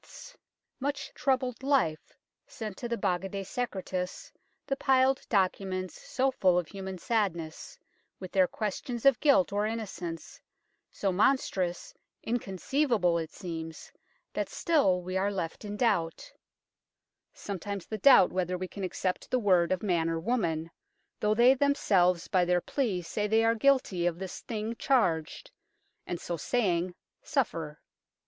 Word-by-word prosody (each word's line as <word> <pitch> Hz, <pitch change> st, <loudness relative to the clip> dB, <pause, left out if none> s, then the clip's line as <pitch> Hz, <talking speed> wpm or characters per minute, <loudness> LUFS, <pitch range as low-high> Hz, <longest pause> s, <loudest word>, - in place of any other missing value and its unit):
's -, -, -13 dB, 0.4 s
much 285 Hz, +2 st, -3 dB
troubled 260 Hz, -3 st, 0 dB
life 265 Hz, -, 0 dB, 0.3 s
sent 215 Hz, -3 st, -6 dB
to 240 Hz, -, -6 dB
the 235 Hz, -, -1 dB
Baga 190 Hz, -2 st, -1 dB
de 195 Hz, 0 st, -4 dB
Secretis 190 Hz, -5 st, -4 dB, 0.3 s
the 275 Hz, -, -1 dB
piled 265 Hz, -1 st, +3 dB
documents 185 Hz, -2 st, -1 dB
so 265 Hz, +1 st, 0 dB
full 185 Hz, -8 st, +3 dB
of 175 Hz, -3 st, 0 dB
human 190 Hz, -1 st, -6 dB
sadness, 180 Hz, -, -2 dB, 0.4 s
with 185 Hz, -2 st, -8 dB
their 185 Hz, -2 st, +4 dB
questions 225 Hz, +5 st, -4 dB
of 275 Hz, -3 st, +6 dB
guilt 275 Hz, -, +4 dB
or 205 Hz, +1 st, +1 dB
innocence, 185 Hz, -7 st, -6 dB, 0.5 s
so 195 Hz, -, -1 dB
monstrous 185 Hz, -4 st, +1 dB, 0.3 s
inconceivable, 225 Hz, -, 0 dB
it 160 Hz, -1 st, -4 dB
seems 165 Hz, -3 st, -7 dB, 0.4 s
that -, -, -2 dB
still 195 Hz, -, +2 dB
we 185 Hz, +1 st, -2 dB
are 200 Hz, +2 st, +1 dB
left 175 Hz, -2 st, -4 dB
in 205 Hz, 0 st, -5 dB
doubt; 185 Hz, -9 st, 0 dB, 1.0 s
sometimes 200 Hz, -1 st, -5 dB
the 215 Hz, -, -5 dB
doubt 250 Hz, -5 st, +7 dB
whether 180 Hz, 0 st, -1 dB
we 185 Hz, +1 st, -4 dB
can 200 Hz, +1 st, -7 dB
accept 185 Hz, 0 st, -2 dB
the 255 Hz, -, +2 dB
word 185 Hz, -7 st, +3 dB
of 185 Hz, +1 st, 0 dB
man 170 Hz, -5 st, +1 dB
or 165 Hz, 0 st, -1 dB
woman, 165 Hz, -6 st, -1 dB, 0.5 s
though 210 Hz, 0 st, +2 dB
they 240 Hz, +3 st, +7 dB
themselves 195 Hz, -, +2 dB
by 185 Hz, -1 st, +3 dB
their 175 Hz, 0 st, +2 dB
plea 200 Hz, -4 st, -1 dB
say 210 Hz, +5 st, -2 dB
they 220 Hz, +2 st, +3 dB
are 225 Hz, 0 st, +4 dB
guilty 225 Hz, -8 st, +2 dB
of 170 Hz, -1 st, -1 dB
this 190 Hz, 0 st, -6 dB
thing 220 Hz, 0 st, -4 dB
charged, 175 Hz, -, 0 dB, 0.6 s
and, 175 Hz, -, -3 dB
so 170 Hz, -, -4 dB
saying, 180 Hz, -, 0 dB, 0.3 s
suffer. 165 Hz, -, -2 dB
195 Hz, 145 wpm, -29 LUFS, 175-235 Hz, 1.0 s, doubt